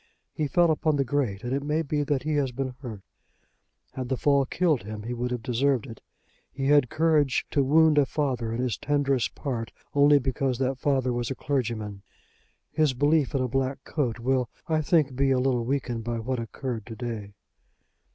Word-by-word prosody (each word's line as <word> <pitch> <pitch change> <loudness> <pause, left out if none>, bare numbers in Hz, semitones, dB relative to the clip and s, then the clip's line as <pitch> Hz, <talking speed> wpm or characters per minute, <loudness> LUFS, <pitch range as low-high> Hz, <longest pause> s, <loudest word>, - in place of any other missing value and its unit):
He 155 - -1
fell 170 +3 +3
upon 155 0 +1
the 140 - +2
grate, 125 -6 -1
and 120 +1 -2
it 140 - 0
may 150 +3 0
be 150 0 -1
that 145 -2 0
he 155 +1 -1
has 135 -3 0
been 130 +1 -3
hurt. 110 -7 -7 0.9
Had 130 -2 -5
the 130 - 0
fall 140 -1 +3
killed 160 -7 +1
him 105 +1 -7
he 120 +3 -4
would 125 +1 -2
have 125 -2 -4
deserved 130 +1 +1
it. 115 -4 -10 0.5
He 135 - -4
had 145 -4 +5
courage 155 -4 +2
to 140 - +2
wound 155 +2 +5
a 140 - +3
father 130 -7 -1
in 115 - -3
his 125 -3 -1
tenderest 140 -3 0
part, 120 -5 -4 0.2
only 145 0 +6
because 130 -1 -1
that 130 0 -1
father 130 -2 +1
was 120 -1 -2
a 135 - -3
clergyman. 115 -8 -2 0.7
His 155 -4 +2
belief 145 +1 +2
in 130 - +1
a - - 0
black 135 +2 -2
coat 125 -7 -2
will, 125 0 0 0.2
I 160 -2 +1
think, 150 -4 +2
be 135 +1 +2
a 130 - +3
little 125 -2 +1
weakened 125 -3 -2
by 120 0 -2
what 125 +2 -2
occurred 115 -1 -5
to 115 - -7
day." 110 -3 -5
130 Hz, 200 wpm, -26 LUFS, 120-145 Hz, 0.9 s, only